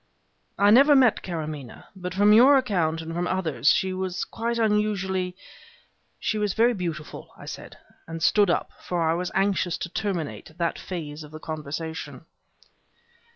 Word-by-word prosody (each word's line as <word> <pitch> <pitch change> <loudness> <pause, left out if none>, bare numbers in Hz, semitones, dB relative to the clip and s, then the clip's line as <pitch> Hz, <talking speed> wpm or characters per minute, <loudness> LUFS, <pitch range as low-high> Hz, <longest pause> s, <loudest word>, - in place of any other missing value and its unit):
"I 205 +1 +5
never 280 +6 +7
met 255 -5 +4
Karamaneh, 155 -7 -6
but 180 -1 -6
from 205 +2 +5
your 260 +6 +7
account, 175 -10 0
and 165 +1 -6
from 175 +1 -1
others, 165 -6 +1
she 190 0 +1
was 185 -1 -3
quite 235 +1 -3
unusually 200 -4 0 0.4
" - - -32 0.3
"She 215 - -1
was 210 -2 -1
very 235 +2 +4
beautiful," 170 -6 -6
I - - -11
said, - - -9 0.3
and 165 0 -6
stood 205 -3 +4
up, 170 - 0
for 175 -2 -1
I 160 - +3
was 180 +1 -2
anxious 190 -2 +1
to 170 - -5
terminate 165 - -4
that 170 -1 -1
phase 155 -4 -6
of 150 - -11
the 155 +1 -10
conversation. 160 +1 -6
180 Hz, 160 wpm, -25 LUFS, 160-210 Hz, 0.4 s, never